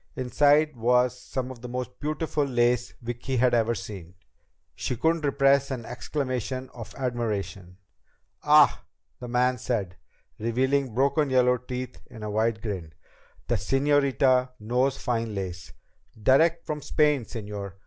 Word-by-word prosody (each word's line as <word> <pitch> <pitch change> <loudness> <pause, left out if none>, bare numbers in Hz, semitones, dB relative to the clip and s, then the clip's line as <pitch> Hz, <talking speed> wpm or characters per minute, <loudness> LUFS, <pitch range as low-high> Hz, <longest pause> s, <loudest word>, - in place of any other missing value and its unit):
Inside 145 +4 +3
was 125 +1 +2
some 130 0 -5
of 120 -3 -11
the 125 - -6
most 125 0 -5
beautiful 155 0 -1
lace 125 -2 +1
Vicki 120 +2 -3
had 125 +1 +3
ever 115 0 +2
seen. 95 -5 -8 0.6
She 125 - -3
couldn't 160 +6 +1
repress 140 -1 +3
an 125 -4 -4
exclamation 130 0 -4
of 115 -3 -10
admiration. 105 -8 -3 0.6
"Ah," - - +5 0.4
the 125 - -7
man 125 +1 +1
said, 105 -8 -2 0.4
revealing 130 +2 0
broken 140 +3 +2
yellow 125 -1 +4
teeth 125 +1 -6
in 115 -4 -10
a 105 - -3
wide 110 0 0
grin. 90 -8 -5 0.5
"The 120 - +1
señorita 135 +2 +2
knows 125 +5 0
fine 115 -3 -2
lace. 90 -3 -5 0.5
Direct 155 +9 +3
from 150 -1 -4
Spain, 150 -4 +2
señor! 105 -4 -6
125 Hz, 135 wpm, -26 LUFS, 115-135 Hz, 0.6 s, Ah